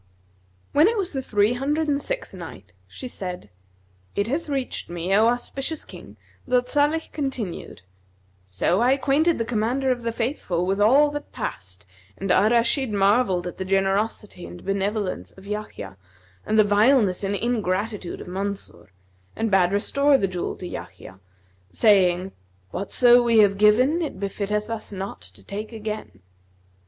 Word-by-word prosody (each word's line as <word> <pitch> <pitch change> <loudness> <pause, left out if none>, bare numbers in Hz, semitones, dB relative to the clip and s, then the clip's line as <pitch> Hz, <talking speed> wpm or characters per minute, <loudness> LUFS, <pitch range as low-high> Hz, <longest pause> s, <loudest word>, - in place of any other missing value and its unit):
When 300 +5 +5
it 460 +1 +1
was 375 -5 -2
the 270 - -2
Three 210 -2 +2
Hundred 295 +5 -1
and 285 -1 +1
Sixth - - -4
Night, - - -10 0.2
She 255 - -8
said, 180 - -7 0.6
It 200 +1 0
hath 295 +6 -2
reached 270 -9 -3
me, 175 +2 -2
O 215 +3 +5
auspicious 270 +5 -2
King, - - -12 0.3
that 250 0 +1
Salih 295 +2 +1
con 285 -3 -1
tinued: 210 - -6 0.7
"So 95 - +1
I 250 +2 +4
acquainted 290 +5 +2
the 230 - -1
Commander 245 +4 0
of 245 -1 -1
the 230 0 -2
Faithful 225 - -2
with 195 +2 0
all 280 +8 +5
that 290 0 -6
passed 95 +2 -6 0.3
and 195 -1 -2
Al 200 +4 +4
Rashid 235 +2 +2
marvelled 200 -2 +2
at 180 - -7
the - - -1
generosity 195 0 -1
and 175 - -11
benevolence 195 - -2
of 190 - -15
Yahya 205 - -6 0.5
and 215 - +1
the 215 - +7
vileness 205 -1 +3
and 200 +1 0
ingratitude 210 -3 -2
of - - -10
Mansur, 190 - -5 0.4
and 225 -1 -1
bade 185 -2 +4
restore 280 +8 +3
the 195 - 0
jewel 180 -2 -4
to 185 - -9
Yahya, 95 - -9 0.5
saying, 190 - +3 0.4
'Whatso 240 +5 +4
we 235 -1 +3
have 200 -1 +4
given 250 +11 +4
it 315 - -4
befitteth 205 +1 -2
us 225 -2 -5
not 195 0 -6
to - - -13
take 210 +3 -6
again.' 215 - -6
215 Hz, 160 wpm, -24 LUFS, 195-255 Hz, 0.7 s, the